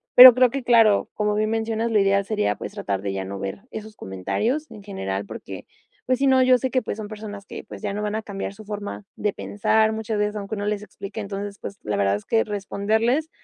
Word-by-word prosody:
pero 250 0 +13
creo 255 0 +5
que 275 0 -3
claro, 225 -4 +4
como 210 -1 0
bien 215 +1 +1
mencionas, 225 +1 -1
lo 215 - +4
ideal 200 0 +3
sería 150 - 0
pues, - - -7
tratar 100 -2 -2
de 100 0 -2
ya 95 -1 -3
no 100 +1 -6
ver 100 - -5
esos 220 0 -8
comentarios 220 - -2
en 210 - -11
general 100 - -4
porque, - - -8 0.4
pues, 255 -1 +1
si 275 - +3
no, 260 -1 +5
yo 255 0 +6
sé 260 - -1
que, 255 - +1
pues, 210 - -4
son 215 -1 -5
personas 210 -2 -8
que, - - -8
pues, - - -10
ya 205 - -2
no 210 +1 -3
van 210 0 -2
a 220 - -1
cambiar 200 -2 -5
su 215 +2 -12
forma 205 0 -6
de 210 -1 -1
pensar, 220 +2 +1
muchas 220 -1 -2
veces, 210 0 0
aunque 205 0 -5
uno 205 0 -3
les 210 0 -1
explique, 205 +1 -8
entonces, 200 0 -5
pues, 200 - -8
la 105 -1 -1
verdad 100 0 +2
es 105 - -7
que 225 - +2
responderles 220 +8 0
210 Hz, 240 wpm, -24 LUFS, 200-225 Hz, 0.4 s, pero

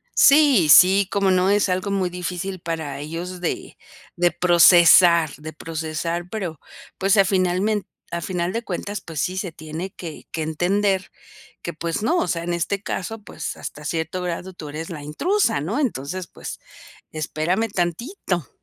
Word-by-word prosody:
Sí, 275 - +6
sí 190 +4 +7
como 195 -1 +2
no 185 +1 +3
es 205 -1 +3
algo 185 +2 -1
muy 190 -2 0
difícil 180 +1 -4
para 160 -5 -4
ellos 170 +5 -6
de 175 - -4 0.4
de 175 0 +3
procesar 175 -2 +6
de 155 +1 -8
procesar 165 +2 -4
pero, 180 -9 -5 0.4
pues, 195 0 +2
a 195 - +6
finalment 190 +2 +1 0.3
a 170 - -3
final 175 0 -2
de 230 - -2
cuentas, 200 0 -4
pues 160 -5 -5
sí, 185 +1 -2
se 180 -2 -3
tiene 160 +4 -7
que 165 -5 -9
que 160 - -3
entender 190 +4 0 0.5
que, 170 - -5
pues 165 +3 -3
no, 340 +10 +2
o 345 - +1
sea, 170 -1 -2
en 175 - -2
este 175 +4 -1
caso, 220 +2 -4
pues, - - -6
hasta 150 0 -8
cierto 165 +3 -3
grado 180 +2 -4
tú 155 -4 -9
eres 155 +3 -6
la 155 -5 -7
intrusa, 155 - 0
¿no?, 210 - -2
entonces, 185 - -2
pues, - - -8 0.5
espérame 160 +7 -1
tantito. 180 - -2
180 Hz, 165 wpm, -22 LUFS, 165-195 Hz, 0.5 s, sí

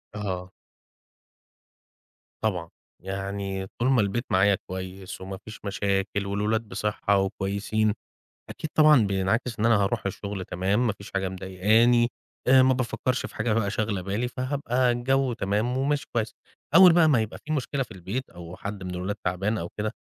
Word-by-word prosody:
آه. 95 -3 -4 1.9
طبعًا، 90 -6 -1 0.3
يعني 95 0 -4
طول 120 +2 +2
ما 125 -4 +4
البيت 105 +5 -1
معايا 95 +1 +4
كويس 95 0 -7
وما 95 0 -6
فيش 110 0 -9
مشاكل 100 0 -1
والولاد 105 +3 0
بصحة 100 0 0
وكويسين 100 +2 0 0.6
أكيد 155 - -6
طبعًا 150 -8 +6
بينعكس 105 +5 0
إن 110 - +2
أنا 115 0 +5
هاروح 110 +3 -1
الشغل 100 -1 -4
تمام، 100 +8 0
ما 110 - +1
فيش 100 -1 -12
حاجة 95 -1 -1
مضايقاني، 110 +6 +3 0.4
آآ 130 0 +7
ما 130 0 +4
بافكرش 130 0 -1
في - - -9
حاجة 110 0 0
بقى 105 -2 +1
شاغلة 105 -3 -1
بالي، 100 +6 -2
فهابقى 125 0 0
الجو 130 +1 +1
تمام 110 +5 0
وماشي 140 +2 0
كويس. 115 -2 -1 0.4
أول 185 -1 +9
بقى 165 -2 +5
ما 125 -6 +4
يبقى 110 - -5
فيه 155 - -2
مشكلة 140 -1 -1
في 120 - -16
البيت 95 +8 -5
أو 85 0 -10
حد 100 0 -6
من 90 -1 -5
الولاد 95 +3 -3
تعبان 95 +5 0
أو 85 -2 -4
كده، 105 0 -1
105 Hz, 160 wpm, -26 LUFS, 95-120 Hz, 1.9 s, أول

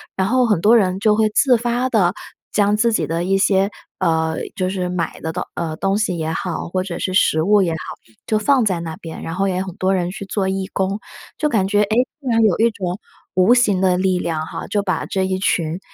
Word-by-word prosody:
然 190 0 0
后 250 +2 +3
很 205 -7 +1
多 225 +3 +6
人 190 -3 +1
就 210 0 +3
会 215 0 +2
自 250 +2 +4
发 240 +2 -1
地 190 -7 +2 0.4
将 205 0 +2
自 230 +1 +2
己 - - 0
的 165 +2 -1
一 195 +2 +1
些， 195 +1 +2 0.3
呃， 160 -1 +1 0.2
就 185 -1 -1
是 185 -2 -2
买 175 -2 -3
的 160 - -3
东 180 - -3
呃， 160 -2 -3
东 195 +3 0
西 205 -4 0
也 160 0 -2
好， 165 0 -3
或 185 +1 -1
者 180 -3 -5
是 185 - -2
食 160 -5 +3
物 205 +2 +4
也 170 - 0
好， - - -3 0.5
就 215 - +2
放 260 +3 +3
在 185 -5 0
那 160 -1 -5
边， 165 -1 -8
然 165 - -5
后 195 +1 0
也 185 -1 -1
有 190 - -2
很 185 -2 -8
多 190 +1 +1
人 180 -1 -1
去 200 - -7
做 195 -1 -1
义 190 0 -2
工。 195 +2 -1 0.4
就 300 - +1
感 195 -6 +1
觉， 205 +1 +2
哎， - - -2 0.3
竟 260 - -4
然 230 - +3
有 205 -5 +4
一 230 +1 +4
种 185 -1 -4 0.4
无 185 +6 +5
形 205 -6 +2
的 180 -1 +3
力 185 -1 +1
量 160 -2 -2
哈， - - -7
就 205 -1 -1
把 185 - -1
这 190 -1 -1
一 185 0 -1
群 170 -2 0
190 Hz, 265 characters per minute, -20 LUFS, 180-210 Hz, 0.5 s, 多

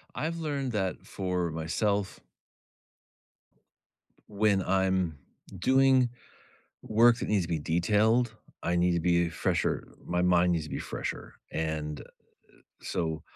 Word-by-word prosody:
I've 165 +2 -2
learned 140 -5 -2
that 95 -4 -2
for 90 -3 -2
myself 95 +5 -1 2.1
when 105 -1 +2
I'm 95 -4 +1 0.4
doing 130 +3 +4 0.7
work 115 +2 +4
that - - -3
needs 100 -3 +2
to - - -10
be 80 -2 0
detailed, 110 +9 +2 0.3
I 85 - 0
need 90 0 +3
to 85 - +1
be 85 -1 +2
fresher, - - -1 0.2
my 90 0 0
mind 90 0 +4
needs 80 - -1
to - - -10
be - - -4
fresher. - - -5 0.2
And, 75 -2 -3
eh, - - -9 0.8
so 80 -2 -3
95 Hz, 125 wpm, -29 LUFS, 85-110 Hz, 2.1 s, doing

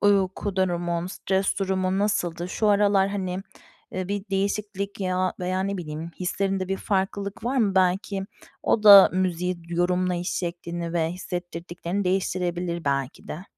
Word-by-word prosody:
uyku 195 -1 +2
durumun, 175 -2 0
stres 190 +1 -1
durumun 190 -1 0
nasıldı? 175 -4 0
Şu 215 +3 0
aralar, 200 -1 +4
hani, 185 -2 -3 0.5
eee, 185 0 -3
bir 200 -1 -2
değişiklik 200 0 -2
ya, 185 -1 0
veya, 185 +1 -1
ne 200 +1 -2
bileyim, 160 -1 -6
hislerinde 190 +1 -1
bir 195 - 0
farklılık 200 +2 -2
var 255 +3 0
mı? 210 -6 +2
Belki 190 +1 +1 0.4
o 215 - +2
da 200 -2 +10
müziği 180 -1 0
yorumlayış 180 +1 0
şeklini 170 -1 -4
ve 165 -2 +1
hissettirdiklerini 175 +1 -4
değiştirebilir 180 -2 -1
belki 140 -2 -2
de. 175 +5 -6
185 Hz, 135 wpm, -25 LUFS, 175-195 Hz, 0.5 s, da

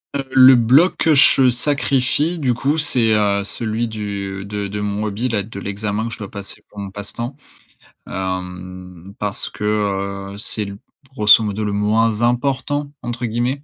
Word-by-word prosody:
Heu, 140 - -1
le 130 0 +8
bloc, 130 +10 +4
que 160 -2 +3
je 135 -1 +6
sacrifie 140 +4 +1
du 130 -5 +1
coup, 140 +6 0
c'est, 125 -7 +2
heu, 100 -1 +2
celui 115 +2 -1
du 100 -2 -5
de 100 0 -4
de 105 +1 -5
mon 105 +1 -2
hobby-là, 110 +1 -1
de 100 -1 -9
l'examen 105 +3 -3
que 115 - -6
je - - -9
dois 100 - -6
passer 100 -2 -9
pour 105 - -20
mon 100 -1 -6
passe-temps, 115 +6 -6 0.7
hem, 90 -1 -6
parce 105 -1 -2
que, - - -9 0.7
heu, - - -10
c'est 105 0 -2
l 100 0 -7 0.4
grosso 105 0 +6
modo 105 +1 -2
«le 105 - -1
moins 110 +2 +1
important» 140 +4 0
entre 120 0 -4
guillemets, 120 +5 -2
110 Hz, 165 wpm, -19 LUFS, 100-125 Hz, 0.7 s, le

